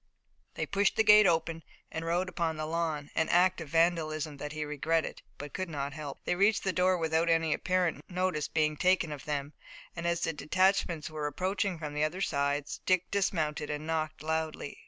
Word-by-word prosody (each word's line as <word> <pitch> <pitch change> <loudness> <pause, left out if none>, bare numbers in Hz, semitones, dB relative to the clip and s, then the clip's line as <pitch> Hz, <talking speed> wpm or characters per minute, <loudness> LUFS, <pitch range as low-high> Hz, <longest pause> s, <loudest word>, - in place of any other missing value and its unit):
They - - -2
pushed 200 0 +1
the 220 - +4
gate 210 -1 +8
open 165 -1 +1 0.3
and 160 - -4
rode 175 +3 0
upon 170 -3 -2
the 155 - -3
lawn, 160 -2 -2
an 160 - +1
act 180 0 +3
of 160 - -7
vandalism 160 -2 +1
that 150 +1 -5
he 155 0 -3
regretted, 155 +2 -1 0.2
but 145 0 -8
could 185 -2 -3
not 140 -2 -3
help. 145 -2 -7
They - - +1
reached 200 +4 +3
the 190 - 0
door 185 0 +3
without 165 0 +1
any 165 -1 +3
apparent 180 -2 -1
notice 180 -4 -1
being 155 -1 0
taken 180 -2 +2
of 145 -2 -7
them, 145 0 -3 0.4
and 170 0 -3
as 170 -1 0
the 165 - 0
detachments 175 -1 +1
were 155 -1 -3
approaching 185 +4 -1
from 150 -2 -6
the 150 0 0
other 155 +5 -1
sides, 140 -3 -1
Dick 185 -1 +2
dismounted 155 -7 0
and 150 +1 -4
knocked 155 -1 -2
loudly. 160 -2 -3
160 Hz, 195 wpm, -30 LUFS, 150-180 Hz, 0.4 s, gate